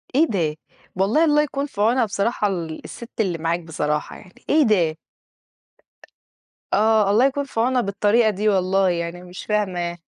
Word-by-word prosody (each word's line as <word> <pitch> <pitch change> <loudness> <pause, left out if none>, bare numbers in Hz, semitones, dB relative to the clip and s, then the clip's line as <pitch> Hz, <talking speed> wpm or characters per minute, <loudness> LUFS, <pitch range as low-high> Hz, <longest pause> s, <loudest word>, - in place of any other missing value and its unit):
إيه 310 +4 +5
ده! 170 - -1 0.4
والله 205 - +2
الله 300 -1 +4
يكُون 280 -1 -2
في 210 -8 -6
عُونها 235 +3 +3
بصراحة 210 +1 -1
ال 170 -5 -4
السِت 235 - -10
اللي 185 -5 -1
معاك 165 +1 -1
بصراحة 150 -2 -3
يعني، 185 - -18
إيه 310 +1 +4
ده! 175 - +2 1.8
آه 215 -1 +3
الله 225 +5 +4
يكُون 275 +1 0
في 275 -5 -6
عونها 250 +2 +2
بالطريقة 210 +2 +2
دي 210 +1 0
والله 190 0 +2
يعني، 170 0 -3
أنا 180 - -13
مش 180 0 -10
فاهمة. 180 -5 -1
200 Hz, 165 wpm, -22 LUFS, 175-235 Hz, 1.8 s, إيه